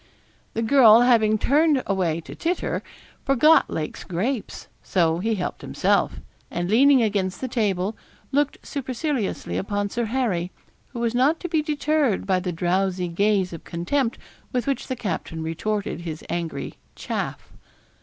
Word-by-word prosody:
The 225 - 0
girl 230 -2 +7
having 225 -3 +4
turned 290 +3 +3
away 175 -4 0
to - - -10
titter, 345 +2 -2 0.4
forgot 290 +4 +5
Lake's 155 -1 -4
grapes; 210 +7 -3
so 170 -3 +1
he 220 +4 0
helped 180 - -4
himself, - - +1 0.3
and 175 +2 -3
leaning 265 +2 +6
against 195 -4 -1
the 260 - -3
table, 210 -4 0 0.4
looked 290 +1 0
superciliously 265 -3 -3
upon 205 0 -2
Sir 235 0 -1
Harry, 215 -8 -1 0.4
who 240 - -8
was 235 -1 0
not 270 +7 +3
to 355 - -3
be 320 -2 +1
deterred 300 -7 0
by 190 -2 +2
the 180 0 -3
drowsy 180 +1 0
gaze 195 +1 +1
of 165 - -8
contempt 230 +9 -1 0.3
with 250 -1 -1
which 275 -3 -2
the 260 - -2
captain 175 -7 -4
retorted 200 +3 -2
his 160 -2 -6
angry 170 -2 -4 0.2
'chaff.' - - -5
215 Hz, 145 wpm, -24 LUFS, 180-265 Hz, 0.4 s, girl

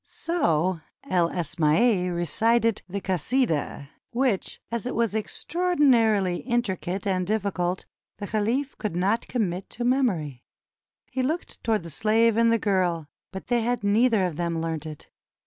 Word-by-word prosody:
So 180 - 0 0.3
El 175 -2 +2
Asmaiy 180 +5 +2
recited 225 +7 +1
the 200 +3 -3
"Kasidah," 185 - -1 0.2
which, 245 -5 -1
as 235 0 -2
it - - -3
was 230 -3 +1
extraordinarily 225 - +2
intricate 200 -6 -2
and 185 -2 0
difficult, 190 -4 -1 0.3
the 205 - -5
caliph 230 +7 -1
could 210 -6 -3
not 200 +6 +1
commit 195 -6 -2
to 240 - -5
memory. 190 - 0 0.7
He 260 - -1
looked 310 +7 -3
toward 220 -5 +1
the 170 - -8
slave 225 +5 +3
and 230 0 +4
the 230 - +4
girl, 180 -6 0 0.3
but 190 - -7
they 240 -1 +1
had 240 0 -1
neither 215 0 +3
of 170 -4 -3
them 170 -1 -1
learnt 160 -1 -3
it. 155 -2 -10
205 Hz, 145 wpm, -25 LUFS, 175-235 Hz, 0.7 s, and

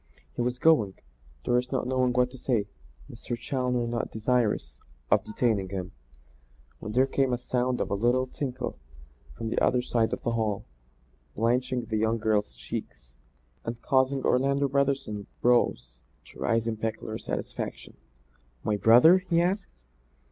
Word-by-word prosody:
He - - -3
was 125 +1 -1
going, 125 -10 +3 0.5
Doris 125 +1 +1
not 130 -2 0
knowing 130 0 +1
what 125 0 +2
to 130 - -11
say, 115 -6 0 0.4
Mr. 120 +1 -6
Challoner 125 -1 -1
not 115 0 -2
desirous 115 0 0 0.3
of - - +4
detaining 105 -4 0
him, 95 -2 -4 0.9
when 105 - -6
there 130 +3 +4
came 135 0 +1
the 125 - +1
sound 125 0 -1
of - - -2
a - - +2
little 120 +5 +2
tinkle 130 - -5 0.6
from 115 - -3
the - - 0
other 125 -1 +3
side 115 -2 +1
of - - -4
the 120 - 0
hall, 110 -3 -1 0.7
blanching 125 +2 0
the 110 -1 -2
young 110 +1 +1
girl's 105 - 0
cheeks - - -7 0.5
and 115 0 -5
causing 130 0 +2
Orlando 140 +2 +2
Brotherson's 135 -7 -1
brows 120 - +1 0.2
to - - -15
rise 115 0 +1
in 115 -1 -2
peculiar 110 0 -4
satisfaction. - - -5 0.7
"My 105 -1 0
brother?" 120 - +7
he 180 -2 0
asked. 185 +4 0
120 Hz, 150 wpm, -27 LUFS, 110-130 Hz, 0.9 s, brother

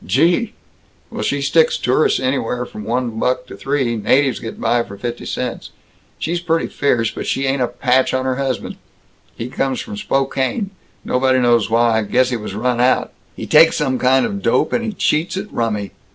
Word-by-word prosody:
Gee! 175 - +2 0.6
Well, - - -5
she 140 +6 -1
sticks 160 +3 +3
tourists 130 +5 +2
anywheres 125 -2 -1
from 105 - -8
one 120 -1 -2
buck 125 +1 0
to - - -10
three. 135 -4 -1
Natives 130 +4 +2
get 115 - -7
by 120 0 +2
for 100 -3 -8
fifty 120 +4 -5
cents. - - -4 0.5
She's 170 +2 -2
pretty 165 -1 0
fierce, 120 -6 0
but - - -6
she 135 - 0
ain't 135 0 0
a 125 - +2
patch 130 +1 +1
on 130 0 -1
her 130 -1 -1
husband. 135 -2 -3 0.6
He 115 - -5
comes 130 +1 -2
from 215 -2 -6
Spokane 135 - -1 0.3
nobody 130 0 +2
knows 120 -3 +3
why 115 0 +3
guess 125 +4 +1
he - - 0
was 105 -3 -6
run 120 +2 0
out. 130 +1 +2 0.2
He - - -6
takes - - +5
some 130 -1 0
kind 130 +1 +3
of 200 -1 -4
dope, - - +1
and 235 - +1
he 220 -2 -3
cheats 170 0 0
at 200 +2 -6
rummy." 105 -4 -2
130 Hz, 190 wpm, -19 LUFS, 120-140 Hz, 0.6 s, takes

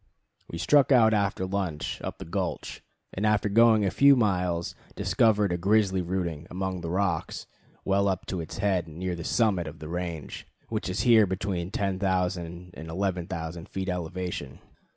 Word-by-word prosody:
We 85 - -5
struck 140 - +4
out 115 -4 +6
after 100 -2 0
lunch 95 -6 -3
up - - -5
the - - -8
gulch, 90 +1 -4 0.3
and 95 - -3
after 105 -1 +2
going 110 0 +5
a 95 - +1
few 140 0 +6
miles 90 -7 0 0.2
discovered 105 -4 +2
a 90 - -1
grizzly 95 0 +2
rooting 85 -3 -3
among 95 0 -3
the 85 - -4
rocks 90 -2 -1 0.4
well 100 +1 +2
up 95 -2 -1
to 90 - -3
its 80 - -7
head, 95 -4 0
near 90 +3 -4
the 85 - -6
summit 95 -5 +1
of 80 - -8
the 75 - -8
range, 85 -3 -5 0.2
which - - -2
is 95 +2 -1
here 110 -3 +6
between 95 -1 -2
10,000 90 -3 -2
and 80 +1 -9
11,000 85 -2 -3
feet 95 0 -4
elevation. 90 -5 -4
95 Hz, 165 wpm, -27 LUFS, 85-100 Hz, 0.4 s, out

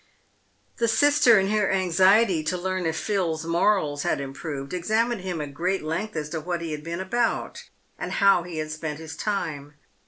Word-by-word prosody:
The 230 - +1
sister, 290 -1 +5
in 195 0 +2
her 210 -2 +2
anxiety 190 0 +3
to 180 +3 -1
learn 185 -1 -2
if 160 - -2
Phil's 170 -6 -1
morals 165 -4 +1
had - - 0
improved, 140 +1 -6
examined 220 +5 0
him 180 -3 -4
at 145 -1 -6
great 180 +4 -1
length 165 +7 -3
as 150 -1 -3
to 160 +1 -3
what 175 +1 -3
he 165 -1 -4
had 150 0 -5
been 170 +2 -4
about, 235 +6 -1 0.3
and - - -4
how 200 -3 +4
he 170 -1 -7
had 155 0 -3
spent 155 -1 -4
his 160 0 -8
time. 150 -8 -3
175 Hz, 185 wpm, -25 LUFS, 155-200 Hz, 0.3 s, sister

